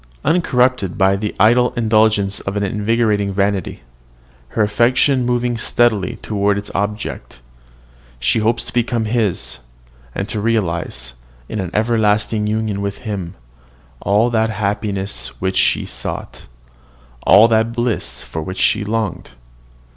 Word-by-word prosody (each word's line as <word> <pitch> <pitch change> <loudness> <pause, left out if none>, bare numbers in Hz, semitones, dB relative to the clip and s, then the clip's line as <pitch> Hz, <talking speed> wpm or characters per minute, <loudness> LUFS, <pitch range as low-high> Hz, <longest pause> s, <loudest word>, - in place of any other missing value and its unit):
Uncorrupted 125 - +1
by 95 -1 +4
the 105 +1 -3
idle 120 +3 +4
indulgence 110 -3 +2
of 100 - -5
an 100 - 0
enervating 105 0 +1
vanity, 100 -5 -1 0.7
her 110 - 0
affection 125 +5 +2
moving 120 0 0
steadily 110 -5 +1
toward 100 -1 +1
its 100 - -6
object, 105 - -4 0.8
she - - +1
hopes 115 +2 +1
to - - -8
become 120 -1 0
his, 105 - -1 0.6
and 100 - -2
to 105 -1 -3
realise, 85 - -1 0.3
in 110 - -4
an 95 -3 -3
everlasting 105 -1 +1
union 105 -2 -1
with 100 0 -3
him, 95 -6 -4 0.6
all 105 +5 +2
that 110 -1 +2
happiness 100 -2 -3
which 95 0 -1
she - - +2
sought, - - -6 0.8
all 105 +3 +8
that 110 0 +2
bliss 120 -1 -2
for 80 - -5
which 95 +4 -6
she 105 - +2
longed. 110 -2 -3
105 Hz, 130 wpm, -18 LUFS, 100-115 Hz, 0.8 s, all